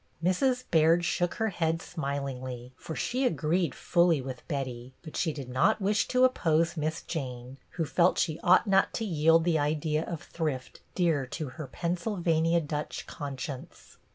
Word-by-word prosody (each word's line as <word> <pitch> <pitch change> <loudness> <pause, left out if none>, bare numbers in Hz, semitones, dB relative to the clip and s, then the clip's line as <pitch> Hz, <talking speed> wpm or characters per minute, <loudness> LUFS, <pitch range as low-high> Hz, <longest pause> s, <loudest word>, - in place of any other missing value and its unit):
Mrs. 250 +8 +2
Baird 165 +1 +4
shook 175 0 0
her 220 -1 0
head 165 -3 0
smilingly, 135 -6 -5
for 160 - -7
she 245 - -1
agreed 165 - +1
fully 170 -3 +3
with 130 -1 -6
Betty; 130 -4 -4
but 155 - -9
she 165 - +1
did 140 -4 -7
not 130 +14 +2
wish 205 +1 +1
to 255 0 +2
oppose 170 -9 +2
Miss 155 0 -2
Jane, 130 -4 -5 0.2
who 165 - +1
felt 175 +4 +3
she 160 -2 0
ought 180 +5 +5
not 195 -2 +3
to 225 - -2
yield 165 -2 +4
the 165 -2 +2
idea 150 +1 0
of 170 -1 -6
thrift 150 -6 -4 0.2
dear 160 -7 +1
to 150 +2 -5
her 155 +2 -7
Pennsylvania 170 - 0
Dutch 150 -1 -4
conscience. 140 -1 -7
160 Hz, 160 wpm, -29 LUFS, 140-175 Hz, 0.2 s, ought